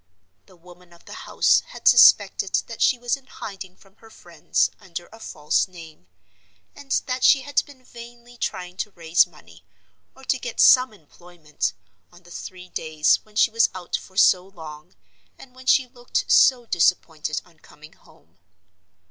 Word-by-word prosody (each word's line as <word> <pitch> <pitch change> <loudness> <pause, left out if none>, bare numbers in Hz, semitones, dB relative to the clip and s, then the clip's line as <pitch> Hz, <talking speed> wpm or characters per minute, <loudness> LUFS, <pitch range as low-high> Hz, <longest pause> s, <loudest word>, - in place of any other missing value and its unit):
The 185 - -20
woman 175 0 -19
of 170 - -22
the - - -11 0.2
house - - +3
had - - -6
suspected - - +5
that - - -10
she 255 - +3
was 240 +1 -1
in 270 -1 -19
hiding 190 -2 -10
from 195 +1 -25
her 225 - -18
friends, - - -2
under 175 -1 -9
a 225 - -15
false 150 -8 -1
name; 165 - -14 0.7
and 280 -1 -14
that 255 0 -4
she 275 - +5
had 285 +1 0
been 270 -3 -17
vainly 240 0 -14
trying 180 -6 -5
to 210 - -4
raise 170 -2 +1
money, 85 - -19 0.5
or 265 - -18
to 260 0 -1
get 245 -2 -7
some 255 -1 +6
employment, 170 -4 -7 0.4
on 175 +1 -19
the 175 - -18
three 180 +1 -10
days 155 -3 +1
when 215 -1 -25
she 220 - +3
was 230 0 +3
out 180 -2 -5
for 185 - -9
so 185 -2 +4
long, 160 -3 -12 0.4
and 255 - -16
when 255 0 -16
she 260 - +4
looked 245 -1 -4
so 250 -3 +4
disappointed 160 -5 0
on 170 -3 -25
coming 155 0 -17
home. 85 +2 -26
185 Hz, 170 wpm, -22 LUFS, 165-240 Hz, 0.7 s, some